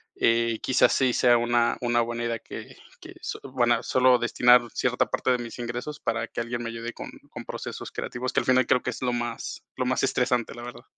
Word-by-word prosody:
eh, 115 -1 +2
quizás 130 - +3
sí 130 -2 +3
sea 120 0 +4
una 120 0 +2
una 120 -1 +2
buena 120 0 -3
idea 115 -1 -1
que - - -10 0.3
que - - -11
so - - -5
buena, 120 -2 +2
solo 130 -1 +4
destinar 125 +1 +5
cierta 125 0 0
parte 130 - 0
de 125 - +2
mis 120 -1 -7
ingresos 120 +5 -5
para - - -2
que - - -6
alguien 120 +1 -4
me 115 - -4
ayude 115 +1 -6
con - - -8 0.2
con - - -8
procesos - - -6
creativos, 125 +1 -4
que - - +2
al - - -7
final 130 -1 +3
creo 125 - +3
que 125 - -1
es 115 - -9
lo 125 -1 0
más 120 -1 -4
lo 125 - -1
más 130 - 0
estresante, 125 -3 +1
la 120 - -9
verdad. 120 0 -9
120 Hz, 225 wpm, -26 LUFS, 120-125 Hz, 0.3 s, destinar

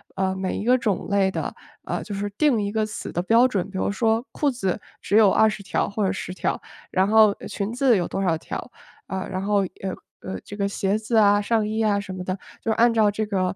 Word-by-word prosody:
呃， 190 0 0
每 190 0 -2
一 - - -3
个 250 +3 +4
种 220 -6 -1
类 195 -1 +2
的， - - -3 0.3
呃， - - -3
就 205 - -7
是 205 +1 -2
定 275 -8 +3
一 200 - -2
个 215 0 0
死 215 0 -6
的 175 - -2
标 230 +5 +5
准， 200 -7 -2
比 190 - -5
如 190 - 0
说 225 +2 +1
裤 290 - +1
子， 205 -6 -2 0.2
只 200 - -1
有 205 -4 +6
20 215 -2 +2
条 - - -1
或 200 0 -1
者 190 - +1
10 190 - -5
条， - - -2 0.3
然 190 +1 +2
后， 220 0 +6
呃， - - -8
裙 205 +3 -3
子 250 -3 +3
有 175 - -1
多 - - -3
少 170 -4 +1
条， - - -7 0.4
呃， 190 0 -4
然 185 - -2
后， 205 0 +2
呃 190 0 -5 0.4
呃， - - -4
这 205 - -8
个 200 -1 0
鞋 200 +1 0
子 225 +2 -3
啊、 205 -1 +5
上 215 0 +1
衣 220 +1 -1
啊 205 -2 +2
什 195 -2 -6
么 185 -1 -5
的， 185 +1 -3 0.2
就 225 - -1
按 230 +1 +4
照 215 -2 +4
这 215 +1 -2
个 185 -3 -1
205 Hz, 255 characters per minute, -24 LUFS, 190-220 Hz, 0.4 s, 有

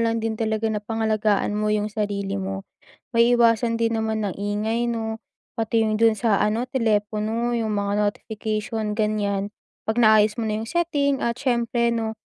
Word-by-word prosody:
lang 230 0 +1
din 225 - 0
talaga 220 0 -2
na 210 - -2
pangalagaan 215 -1 0
mo 210 0 0
yung 210 0 0
sarili 200 -2 -2
mo. 195 0 -4 0.5
Maiiwasan 230 -1 +4
din 230 0 +1
naman 220 -1 -1
ang 190 - -5
ingay, 220 +4 -1
'no, 220 -1 -4 0.3
pati 225 0 0
yung 215 - +1
dun 225 +1 +5
sa 215 -1 +1
ano, 225 +4 0
telepono 220 0 0
yung 220 -2 -1
mga 205 0 0
notification, 215 +1 -3
ganiyan, 210 -1 -1 0.3
'pag 220 - 0
naayos 215 -1 +5
mo 230 - -3
na 215 0 -1
yung 225 - -5
setting 290 -5 0
at 235 +1 -1
siyempre, 235 -2 +1
'no, 220 -1 -3
220 Hz, 165 wpm, -23 LUFS, 210-230 Hz, 0.5 s, dun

